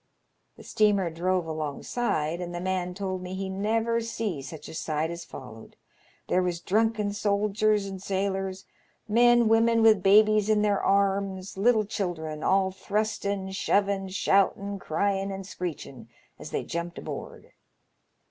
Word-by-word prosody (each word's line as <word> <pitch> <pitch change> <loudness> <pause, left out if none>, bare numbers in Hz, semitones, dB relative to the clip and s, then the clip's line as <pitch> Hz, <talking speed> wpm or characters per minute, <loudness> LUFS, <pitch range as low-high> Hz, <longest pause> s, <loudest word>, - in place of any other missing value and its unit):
The - - -12
steamer 200 -5 +2
drove 180 +2 0
alongside, 155 - -2
and 175 0 -5
the - - -3
man 180 -1 -2
told 190 -1 -3
me 180 +1 -6
he 190 0 -4
never 225 +4 0
see 225 -8 -3
such 150 +2 -9
a - - -9
sight 160 0 -2
as 170 0 -6
followed. 110 -7 -11 0.5
There 185 - +2
was 180 -2 -1
drunken 215 +2 +1
soldiers 205 0 +1
and 195 -1 -7
sailors, 195 -1 -2 0.4
men, 240 +1 +5
women 225 +1 +4
with 215 -3 +6
babies 215 +2 +5
in 210 -1 +3
their 205 -2 +2
arms, 195 -1 0
little 215 +2 +3
children, 165 -7 -4
all 190 +1 +2
thrustin', 200 0 -2
shovin*, 195 0 +1
shoutin', 200 +1 +1
cryin', 195 +4 -1
and 195 0 -6
screechin* 150 - -7 0.3
as 150 - -8
they - - -2
jumped 170 0 -5
aboard. - - -8
195 Hz, 140 wpm, -27 LUFS, 180-210 Hz, 0.5 s, with